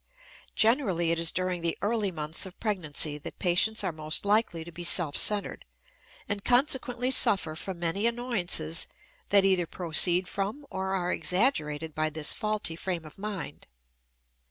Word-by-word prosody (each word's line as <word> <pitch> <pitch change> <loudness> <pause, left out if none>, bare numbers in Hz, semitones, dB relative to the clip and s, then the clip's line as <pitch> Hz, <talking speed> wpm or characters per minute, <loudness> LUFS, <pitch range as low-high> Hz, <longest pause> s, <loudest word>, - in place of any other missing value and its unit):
Generally 215 - +3
it 170 - 0
is 165 0 +2
during 185 -1 -1
the 165 -1 -1
early 210 -1 +1
months 155 +2 -4
of 185 - -14
pregnancy 155 -8 -1
that - - -9
patients 185 +5 +1
are - - -1
most 155 +3 -1
likely 205 -5 +1
to 170 - -11
be 175 +1 -8
self 170 -4 +2
centered, 205 -1 +1 0.6
and 200 0 -3
consequently 250 -1 +2
suffer 190 -10 +2
from 185 +2 -5
many 175 +6 0
annoyances 195 -9 +2 0.4
that 200 -1 +5
either 185 -3 +2
proceed 175 +1 +2
from 205 +11 -4
or 190 0 -2
are 180 -1 -1
exaggerated 160 - 0
by 155 +1 0
this 155 -1 -2
faulty 215 -6 -2
frame 170 -1 -4
of 155 - -13
mind. 205 -3 -6
180 Hz, 155 wpm, -28 LUFS, 165-210 Hz, 0.6 s, that